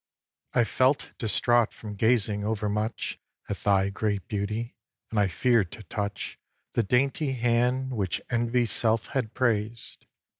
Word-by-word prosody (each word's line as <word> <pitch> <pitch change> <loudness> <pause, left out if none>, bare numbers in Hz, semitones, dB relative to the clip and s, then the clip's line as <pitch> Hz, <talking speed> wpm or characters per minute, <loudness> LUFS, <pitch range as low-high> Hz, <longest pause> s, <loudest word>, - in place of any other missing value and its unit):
iv. 120 - +6
I - - +5
felt 130 +4 +2
distraught 115 +2 +3
from 105 -2 -8
gazing 105 -1 +2
over 105 0 -1
much 105 +2 -2 0.3
At - - -3
thy 100 -1 +2
great 100 -1 -1
beauty; 105 +3 -3 0.4
and 110 - +1
I 100 - +4
fear'd 100 +2 +2
to 110 - -9
touch 105 +2 -4 0.3
The - - +3
dainty 135 +5 +1
hand 125 +2 +1
which 100 -8 -1
Envy's 120 0 +1
self 110 -2 +2
hath 125 -6 -1
praised. 115 -2 -1
110 Hz, 145 wpm, -27 LUFS, 105-120 Hz, 0.4 s, iv